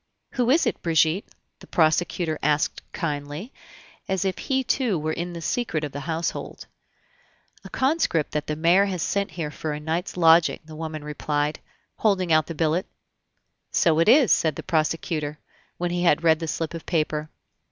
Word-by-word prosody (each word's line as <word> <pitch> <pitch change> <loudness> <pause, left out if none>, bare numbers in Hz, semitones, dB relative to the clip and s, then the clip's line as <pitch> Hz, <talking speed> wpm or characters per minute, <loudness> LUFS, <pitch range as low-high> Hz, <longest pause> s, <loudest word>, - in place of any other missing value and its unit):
"Who 245 -2 0
is 300 +3 +4
it, 235 - -1
Brigitte?" 165 +3 +2 0.3
the - - -14
prosecutor 160 0 +1
asked 150 +1 +1
kindly, 150 - -4 0.5
as 190 0 -1
if 190 - -1
he 265 -1 0
too 240 -6 +1
were 155 +1 -2
in 175 +2 -4
the 170 -1 -7
secret 170 -7 -1
of 145 - -3
the 145 - -5
household. 165 +1 -3 1.0
"A - - -10
conscript 260 - +1
that 150 -1 -2
the 150 - -1
mayor 170 +5 +4
has 185 -4 -2
sent 200 -1 -1
here 155 -2 -5
for 155 0 -4
a 150 - -4
night's 165 +5 -3
lodging," 165 -1 +5
the 155 -1 -11
woman 155 -1 -5
replied, 150 0 -2 0.4
holding 185 -6 +2
out 155 0 +3
the 165 - -6
billet. 165 +4 0 0.8
"So 160 -2 +3
it 170 - +4
is," 260 -2 +6
said 160 -3 +3
the - - -6
prosecutor, 155 -2 -1 0.4
when 175 0 -2
he 175 0 -1
had 170 -2 +3
read 160 -1 +4
the 165 - -4
slip 160 +1 -3
of 165 - -8
paper. 155 -2 -1
165 Hz, 175 wpm, -24 LUFS, 155-180 Hz, 1.0 s, is